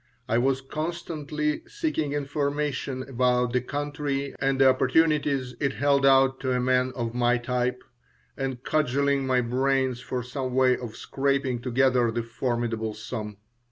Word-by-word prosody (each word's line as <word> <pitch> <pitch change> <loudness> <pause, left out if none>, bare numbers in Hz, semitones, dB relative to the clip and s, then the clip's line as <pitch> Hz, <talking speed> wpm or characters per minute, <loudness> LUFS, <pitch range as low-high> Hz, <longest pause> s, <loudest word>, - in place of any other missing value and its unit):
I 115 - +2
was 135 +1 +1
constantly 155 0 -3
seeking 310 - -2
information 145 -2 -2
about 125 -1 +1
the 125 - +2
country 145 0 -3
and 135 0 +1
the 135 - +7
opportunities 135 -1 +2
it 140 -2 0
held 140 -1 +3
out 135 0 +4
to 130 -1 -1
a 125 - +1
man 125 0 +2
of 115 -2 -3
my 120 0 +2
type, 125 +1 -2 0.5
and 130 -2 -4
cudgeling 140 -2 +1
my 130 -1 +3
brains 130 +1 0
for 125 0 -4
some 130 0 -4
way 130 -1 +4
of 120 -3 -7
scraping 135 -3 -1
together 125 -1 +2
the 120 +1 -2
formidable 115 -2 -2
sum. 110 -1 -6
130 Hz, 145 wpm, -26 LUFS, 125-140 Hz, 0.5 s, the